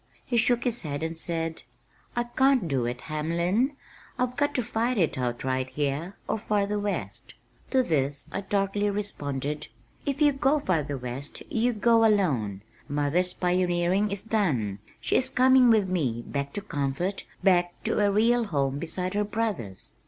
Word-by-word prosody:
He 245 - -2
shook 240 +1 +3
his 240 -1 0
head 145 -1 -4
and 165 +1 -2
said, 165 0 -2 0.5
"I 240 - +1
can't 255 -3 +2
do 130 -5 0
it, 120 0 -4
Hamlin. 170 - 0 0.4
I've 250 0 0
got 290 +1 0
to 250 - +1
fight 230 +3 0
it 170 -7 +2
out 120 -2 -2
right 130 0 -1
here 150 +7 -2
or 220 - -1
farther 205 -1 0
west." 205 -1 -4 0.3
To 260 -1 +3
this 140 - -1
I - - -2
darkly 200 +1 0
responded, 150 -8 -3 0.4
"If 280 0 -2
you 295 -1 +5
go 275 +2 +2
farther 150 - -1
west 125 +3 -6
you 235 +2 +2
go 225 +1 +4
alone. 135 - +2 0.3
Mother's 150 +6 +1
pioneering 180 +2 +1
is 200 -1 -3
done. 145 - 0 0.2
She - - +2
is 260 - 0
coming 260 -1 +5
with 215 -4 +4
me, 135 -11 -1
back 140 0 -3
to 205 - -3
comfort, 170 +1 -2 0.2
back 175 -2 +3
to - - 0
a 205 - +4
real 230 +4 +3
home 140 -6 0
beside 180 +4 -3
her 205 +1 +1
brothers." 205 - -3
185 Hz, 165 wpm, -27 LUFS, 145-225 Hz, 0.5 s, you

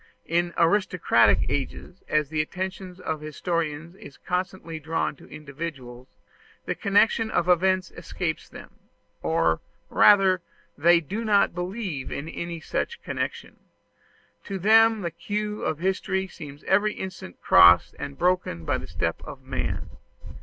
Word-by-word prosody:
In 175 +1 0
aristocratic 165 - +3
ages, 145 +6 -4
as 150 -2 +1
the 155 -1 0
attention 185 +2 -5
of 155 -1 -2
historians 160 +1 -3
is 145 -7 -13
constantly 180 -3 -4
drawn 160 0 -2
to - - -16
individuals, 140 -4 -8 0.6
the - - -1
connection 220 +2 +2
of 175 -4 0
events 185 0 +2
escapes 165 -4 -4
them; - - -12 0.5
or 80 -1 +1 0.3
rather, 195 -3 +5 0.3
they 170 +3 +5
do 205 +9 -4
not 210 -2 +3
believe 180 - -4
in 140 - -5
any 170 0 -5
such 470 - -3
connection. - - -4 0.9
To 195 - -4
them 220 +3 +5
the 170 -2 -3
clew 210 +4 -4
of 155 - -1
history 190 +2 -1
seems 145 -5 -11
every 210 +1 +2
instant 185 - -8
crossed 85 0 +6
and 140 -1 -6
broken 180 - 0
by - - 0
the - - -9
step - - -2
of - - -10
man. - - -4
175 Hz, 135 wpm, -25 LUFS, 150-190 Hz, 0.9 s, crossed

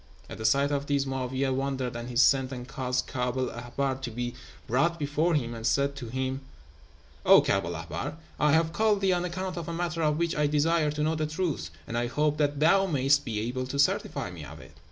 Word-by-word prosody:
"At - - -7
the 110 - -4
sight 140 +4 +3
of 140 0 -1
these 140 -1 +1
Mo'áwiyeh 130 0 -1
wondered, 130 -2 -2
and 120 +1 -5
he 125 - -7
sent 130 +2 +4
and 125 -1 -6
caused 130 -1 -2
Kaab 125 -2 -2
el 130 -1 0
Ahbár 130 +3 -3
to 130 - -3
be 120 +1 -4 0.3
brought 160 +8 +1
before 155 +3 +1
him, 120 -5 -1
and 115 -1 -7
said 140 +5 +1
to 125 -4 -6
him, 130 +2 -2 0.8
'O - - +8
Kaab 95 -1 +1
el 85 0 -4
Ahbár, 85 - -5 0.2
I 150 - +4
have 160 0 +2
called 210 +1 +2
thee 190 -1 +3
on 175 0 0
account 185 0 -4
of 170 -1 -5
a - - -3
matter 170 -1 -2
of 150 -1 +2
which 170 0 0
I 150 -1 +2
desire 150 +1 +2
to 150 0 -2
know 155 +1 +1
the 155 -1 -1
truth, 160 -1 -2 0.2
and 115 - -6
I 120 0 0
hope 150 +4 0
that 145 -1 0
thou 195 +5 +4
mayest 140 -3 +2
be 110 -4 -2
able 125 +3 -3
to 140 - -4
certify 140 -9 +1
me 85 -4 -9
of 75 +2 -10
it.' - - -15
140 Hz, 235 wpm, -28 LUFS, 125-155 Hz, 0.8 s, O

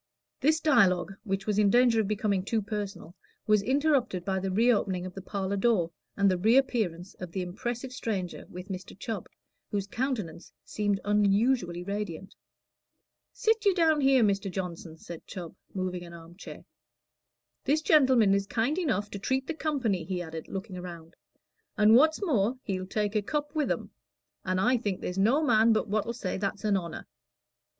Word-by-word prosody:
This 310 +3 +3
dialogue, 200 - +3
which 195 -3 -2
was 210 -1 +1
in 205 -1 +5
danger 240 0 +4
of 205 - -2
becoming 205 -2 0
too 220 +3 0
personal, 200 -5 -5 0.3
was 210 -1 +4
interrupted 260 - +1
by 190 -1 0
the 190 +1 -2
reopening 200 -3 +2
of 185 - -7
the 195 - -7
parlor 195 0 -3
door, 195 -6 +2 0.3
and 200 -1 +4
the 185 -2 +2
reappearance 215 -5 +1
of 180 -2 -7
the 185 +1 -2
impressive 240 +8 -5
stranger 195 -8 -4
with 180 +2 -9
Mr. 185 -1 -7
Chubb, 205 -2 -5 0.4
whose 200 -2 -2
countenance 215 - -4
seemed 205 -2 -1
unusually 205 -2 +2
radiant. 200 -2 -5 1.0
"Sit 445 -1 +1
you 400 -3 +4
down 320 -4 +3
here, 270 -3 +5
Mr. 200 -1 +1
Johnson," 175 -3 -6
said 165 0 -10
Chubb, 175 -4 -8 0.2
moving 185 -2 -3
an 170 -1 -11
arm 165 +1 -13
chair. 195 - -10 1.0
"This 310 +3 +2
gentleman 260 -11 +5
is 200 0 0
kind 245 - 0
enough 250 - -1
to 200 - -5
treat 260 +6 -1
the 325 - -3
company," 265 - -1
he 180 +2 -3
added, 160 -2 -6
looking 190 -2 -6
round, 170 -2 -9 0.6
"and 215 0 +6
what's 315 - +4
more, 245 - +1
he'll 185 -2 -3
take 210 +1 -1
a 215 - +3
cup 295 +6 -3
with 305 -3 0
'em; - - -2 0.5
and 185 -1 0
I 250 +6 +3
think 205 -5 -3
there's 180 +2 -3
no 250 +10 +3
man 225 -4 +5
but 215 - 0
what'll 215 +3 -1
say 190 -6 -4
that's 200 +1 -3
a 210 - +2
honor." 170 -4 -3
205 Hz, 175 wpm, -28 LUFS, 185-245 Hz, 1.0 s, and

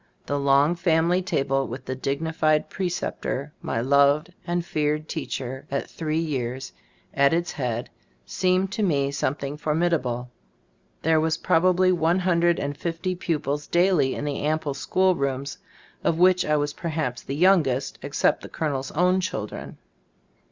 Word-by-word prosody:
The 145 - -1
long 140 +3 +4
family 170 +1 +2
table 135 -6 0
with 130 +2 -7
the 130 - -3
dignified 155 +3 0
pre 190 -2 -1
ceptor, 150 -5 -3
my 115 - -2
loved 140 +5 +3
and 175 0 -1
feared 150 -1 -1
teacher 130 +2 -5
at 140 0 -2
three 155 -1 -2
years, 130 -5 -3 0.4
at 140 +3 +4
its 170 0 -1
head, 120 -4 -3 0.4
seemed 185 +1 +1
to 215 - -2
me 140 -8 +1
something 140 0 -2
formidable. 150 -6 0 0.7
There 160 0 +3
were 160 - +1
probably 185 +2 +4
one 170 0 +2
hundred 175 -2 +2
and 145 0 -3
fifty 170 +4 -3
pupils 150 -5 -2
daily 175 -6 +3
in - - -4
the 145 -2 -2
ample 150 -1 0
school 185 +7 +2
rooms, 140 -2 -3 0.4
of 160 - +1
which 180 +1 +4
I 150 0 +2
was 145 0 -1
perhaps 155 -8 -3
the 135 - -5
youngest, 155 -7 +2
except 140 +1 +1
the - - -9
colonel's 140 -4 -2
own 180 +3 +3
children. 110 - -5
150 Hz, 150 wpm, -25 LUFS, 140-175 Hz, 0.7 s, long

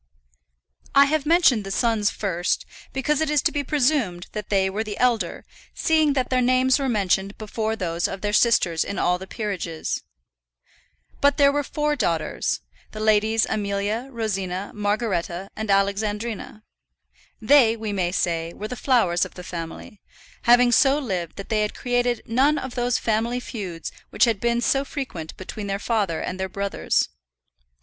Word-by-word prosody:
I 280 0 +8
have 300 0 0
mentioned 320 - +4
the 195 - -7
sons 215 0 +1
first, 180 -4 -1 0.3
because 290 +3 0
it 315 - +1
is 300 -3 +2
to - - +2
be 290 - -1
presumed 255 - +1
that 210 -2 -6
they 195 -2 +2
were 200 +3 -2
the 210 -2 -6
elder, 245 -3 0 0.3
seeing 315 -2 +3
that 260 -2 -1
their 255 0 +3
names 255 +2 +3
were 270 -1 0
mentioned 195 -2 0
before 220 +1 -2
those 170 -4 -1
of 195 - -6
their 205 0 -1
sisters 195 -8 +3
in 200 - -5
all 180 0 +1
the 190 - -8
peerages. 185 -8 -3 1.2
But 285 0 +4
there 280 -1 +6
were 290 +1 0
four 300 +1 -1
daughters, 165 - -1 0.3
the 215 - -6
Ladies 215 +1 +3
Amelia, 210 +4 -2
Rosina, 195 -5 -3
Margaretta, 200 -3 -2
and 220 0 -5
Alexandrina. 210 +2 -1 0.8
They, 230 -1 +5
we 220 -2 -4
may 180 -3 0
say, 170 -2 -1
were 210 - -6
the 250 - -5
flowers 230 -10 +2
of - - -6
the 180 - -8
family, 170 +4 -7 0.4
having 245 +1 +6
so 270 +3 +5
lived 185 - -3
that 200 - -8
they 215 -2 +1
had 210 - -2
created 245 -2 0
none 270 +6 +3
of 260 -2 -5
those 245 -1 +1
family 230 +2 0
feuds 185 -10 -6 0.2
which - - +3
had 225 -4 0
been 235 +1 +1
so 270 +3 +2
frequent 260 - -6
between 200 +2 -6
their 195 0 -1
father 200 -6 -1
and 185 - -4
their 190 0 -2
brothers. 200 +1 0
215 Hz, 165 wpm, -23 LUFS, 195-250 Hz, 1.2 s, I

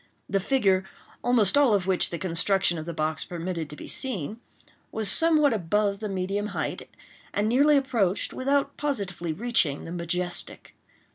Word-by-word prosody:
The 195 - 0
figure, 195 -4 +2 0.4
almost 235 -4 +3
all 280 -7 +5
of 190 -3 -1
which 190 -1 +1
the 170 - -4
construction 180 0 +1
of 155 - -8
the - - -3
box 155 -1 -2
permitted 170 -2 -5
to 150 - -9
be - - -10
seen, 220 - -3 0.5
was 220 -1 -1
somewhat 310 -4 +5
above 200 +1 0
the 215 -1 -4
medium 195 +2 -2
height, - - -4 0.5
and 205 +1 +1
nearly 285 +6 +4
approached, 230 -9 0
without 280 +1 0
positively 200 - -3
reaching, 180 -6 0
the 165 - -7
majestic. 175 +1 -3
200 Hz, 155 wpm, -26 LUFS, 175-245 Hz, 0.5 s, all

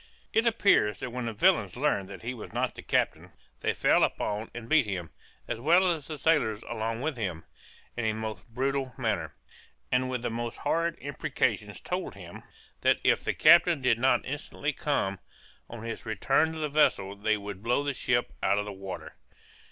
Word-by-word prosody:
It 225 +1 +3
appears 200 - +3
that 125 - -5
when 125 -1 -3
the - - -1
villains 180 - +3
learned 120 -8 0
that 100 +1 -10
he 120 +2 -3
was 115 - -9
not - - -1
the - - -9
captain, - - -1 0.3
they - - +1
fell - - +4
upon 105 +2 -1
and 120 -1 -8
beat 150 -3 +4
him, 90 -5 -4 0.4
as 120 - -3
well 175 +7 +4
as 150 -4 -7
the 155 - -5
sailors 140 -8 +2
along 115 0 -3
with 150 -1 -2
him, 90 -7 -3 0.5
in 120 - -2
a 110 - +2
most 110 +1 -6
brutal 135 +1 -1
manner, 105 - -1 0.6
and 130 0 +2
with 125 -2 -3
the 120 - -1
most 120 0 -4
horrid 165 +2 0
imprecations 140 +1 -2
told - - -4
him, - - -10 0.4
that - - +4
if - - +3
the - - -1
captain 170 0 +6
did 125 -3 +2
not 130 +2 +3
instantly 145 +1 -3
come, 100 -11 -1 0.5
on 115 -1 -8
his 115 0 -5
return 135 +9 +1
to 160 - -7
the 155 -1 -1
vessel, 140 -9 +2
they 110 +2 +1
would 100 -2 -7
blow 120 +5 +1
the 145 -1 -1
ship 120 -1 0
out 100 - +2
of 105 - -1
the 105 - -6
water. 95 -1 -7
120 Hz, 190 wpm, -28 LUFS, 110-145 Hz, 0.6 s, captain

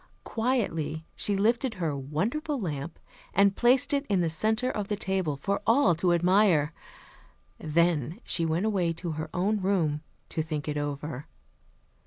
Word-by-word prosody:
Quietly 165 - -1
she 205 - 0
lifted 230 +4 +1
her 165 -6 -2
"wonderful 215 - -2
lamp" 160 -4 -4 0.4
and 200 0 +4
placed 265 +4 +4
it 280 -1 +1
in 195 -2 +2
the 170 -2 +1
center 220 +8 +1
of 205 -2 -3
the 210 - -1
table 190 -6 -1
for 200 +8 -1
all 230 -5 +5
to 175 +2 +1
admire. 175 -3 +3 0.9
Then 160 -1 +1
she 170 - +1
went 165 +4 0
away 185 -6 +1
to 170 +1 -5
her 155 0 -4
own 200 +3 0
room 170 -6 +1 0.3
to 160 - -2
think 155 -2 -4
it 150 - -2
over. 145 -1 -4
175 Hz, 155 wpm, -28 LUFS, 155-210 Hz, 0.9 s, all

